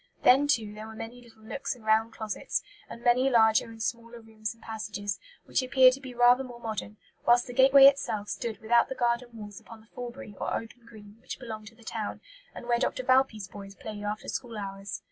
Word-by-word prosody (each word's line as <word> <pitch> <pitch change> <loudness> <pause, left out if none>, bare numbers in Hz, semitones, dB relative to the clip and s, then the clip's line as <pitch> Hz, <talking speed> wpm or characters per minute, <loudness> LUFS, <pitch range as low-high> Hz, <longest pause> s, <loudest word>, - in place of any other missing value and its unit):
Then, 270 +3 +6
too, 225 -7 +1
there 215 +1 -8
were 220 - -10
many 230 +3 -8
little 225 -2 -19
nooks 270 +4 -4
and 230 -3 -17
round 220 +1 +3
closets, 215 -2 -3 0.3
and 235 - -10
many 250 +2 +4
larger 220 -3 +5
and 225 -1 -7
smaller 235 0 -4
rooms 220 -1 -6
and 230 -1 -16
passages, 205 -2 -4 0.3
which - - +1
appeared 255 0 +6
to 275 - -7
be 260 -2 -9
rather 245 +2 +5
more 245 -2 -10
modern; 215 -2 -5 0.3
whilst 240 0 +5
the 245 - -8
gateway 270 +2 +8
itself 220 -7 +3
stood 230 0 -4
without 235 +1 +4
the 265 - -4
garden 240 0 0
walls 210 -3 -9
upon 230 - -13
the 220 - -21
Forbury 245 -2 -7
or - - -1
open 230 +1 -7
green, 210 -1 -14
which - - -7
belonged 220 -4 -8
to 225 - -13
the 230 - -19
town, 220 -2 -4 0.4
and - - -8
where 240 0 +2
Dr. 255 0 -1
Valpy's 255 -6 +2
boys 195 0 -10
played 210 0 -7
after 210 +1 -4
school 235 -3 -4
hours. 195 -1 -5
230 Hz, 215 wpm, -28 LUFS, 215-245 Hz, 0.4 s, gateway